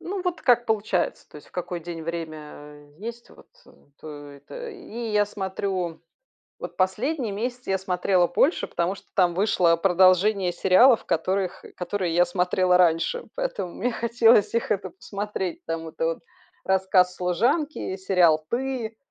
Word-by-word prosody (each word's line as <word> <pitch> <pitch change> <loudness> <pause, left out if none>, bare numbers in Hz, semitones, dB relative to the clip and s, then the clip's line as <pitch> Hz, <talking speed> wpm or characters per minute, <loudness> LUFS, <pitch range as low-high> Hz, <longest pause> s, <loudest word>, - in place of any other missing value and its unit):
Ну 385 +2 -4
вот, 360 -2 -3
как 240 -1 +3
получается, 215 -4 -1
то - - -12
есть 150 - -14
в - - -28
какой 175 -1 -4
день 165 -1 -7
время 150 -3 -8
есть 235 +3 -8
вот, - - -18 0.2
э, - - -17 0.3
то 145 -2 -9
это 145 - -9
И 320 - -7
я 210 0 +4
смотрю 190 -3 -4 0.6
вот - - -7
последний 220 +6 -1
месяц 245 +4 -4
я 190 0 0
смотрела 180 -1 +1
больше, 285 - +2
потому 175 +2 -1
что - - -16
там 175 -3 +3
вышло 180 -4 +3
продолжение 185 +2 +3
сериалов, 205 +8 +5
которых, 185 +3 -1
э, - - -13
которые 180 -1 -3
я 175 +1 +5
смотрела 180 0 +2
раньше, 175 - +2
поэтому - - -3
мне 245 +4 -1
хотелось 235 -2 +3
их, 230 - -1
это, 190 -3 -1
посмотреть. 200 -2 -5
Там 165 0 -4
это 160 0 -3
вот: 165 - -1 0.5
"Рассказ 190 -1 +2
служанки", 220 - 0
сериал 180 -5 +3
"Ты", 245 -3 -3
190 Hz, 155 wpm, -25 LUFS, 175-225 Hz, 0.6 s, сериалов